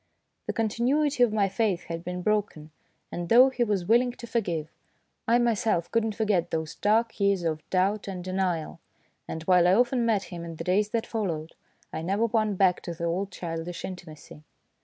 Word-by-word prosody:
The - - -1
continuity 250 +6 +1
of 240 -3 +5
my 210 -2 +2
faith 195 -2 0
had 165 0 -6
been 180 0 -5
broken, 200 -8 -1 0.4
and 175 0 -5
though 255 +3 +7
he 245 -2 0
was 205 -6 -1
willing 240 +4 +3
to 240 - -10
forgive, 175 -9 -2 0.6
I 235 +1 +5
myself 225 -7 +1
could 230 -1 +2
not 220 -2 -2
forget 205 -6 +1
those 160 -1 -3
dark 220 +2 +1
years 200 -3 +2
of 155 -2 -1
doubt 195 +3 +1
and 185 -2 -5
denial; 185 -3 -2 0.5
and 160 - -5
while 180 0 +4
I 180 - +5
often 245 +2 +2
met 220 -4 +1
him 170 -1 -6
in 165 -1 -7
the 165 - -6
days 200 +4 +1
that 225 +1 -1
followed, 170 -8 -3 0.4
I - - -3
never 195 +7 +1
won 215 -2 +1
back 185 -1 +3
to 170 - -6
the 170 - -7
old 180 +4 -1
childish 170 0 -5
intimacy. 165 -5 -10
195 Hz, 190 wpm, -27 LUFS, 170-225 Hz, 0.6 s, though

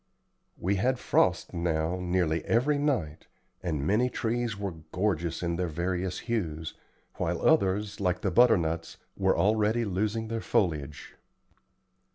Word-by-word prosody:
We 100 +3 0
had 125 +6 +1
frost - - +1
now 85 0 -1
nearly 90 -3 0
every 140 +6 +2
night, 120 - -1 0.3
and 75 -6 -2
many 110 +9 +2
trees 120 -2 -2
were 100 -1 -3 0.2
gorgeous 85 -4 -1
in 85 -1 -1
their 90 0 -1
various 90 +3 -2
hues, 80 -10 -3 0.4
while - - -1
others, 100 +2 +2
like 90 -2 0
the 95 - 0
butternuts, 85 -8 +3 0.2
were - - +2
already 110 +3 +2
losing 105 +3 -1
their 115 0 -3
foliage. 75 -9 -1
95 Hz, 130 wpm, -28 LUFS, 85-110 Hz, 0.4 s, butternuts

